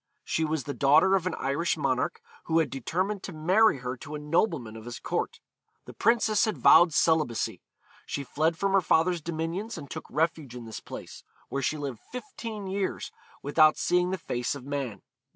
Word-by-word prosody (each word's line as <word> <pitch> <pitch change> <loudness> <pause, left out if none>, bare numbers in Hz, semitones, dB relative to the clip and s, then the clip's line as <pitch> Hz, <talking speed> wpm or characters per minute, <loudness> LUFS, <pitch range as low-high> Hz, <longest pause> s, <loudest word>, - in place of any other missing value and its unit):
She 160 - -1
was 155 -2 -1
the 145 - -4
daughter 150 +8 +5
of 185 -2 0
an - - -2
Irish 140 +6 0
monarch, 455 - -1 0.2
who 165 - +1
had 160 -5 +2
determined 185 - -2
to 195 - -7
marry 180 +4 +3
her 125 +1 -2
to 145 +4 -8
a - - -4
nobleman 150 - 0
of 110 0 -10
his 120 -1 -6
court. - - -3 0.5
The - - -10
princess 220 -3 +3
had 215 - -2
vowed 175 -1 +7
celibacy. 155 -6 +1 0.5
She 140 - -3
fled 155 +5 0
from 195 +2 0
her 195 - +5
father's 170 0 +2
dominions, 170 +7 -3
and 140 -4 -9
took - - -6
refuge 155 -4 -1
in 120 -1 -8
this 110 - -7
place, - - -9 0.3
where 140 - -2
she 150 +3 0
lived 140 -6 -5
fifteen 230 - -6
years 190 0 -3 0.3
without 155 +2 +5
seeing 180 0 +2
the 190 - -1
face 125 -6 -2
of 135 -2 -9
man. 135 -8 -4
160 Hz, 190 wpm, -28 LUFS, 140-185 Hz, 0.5 s, vowed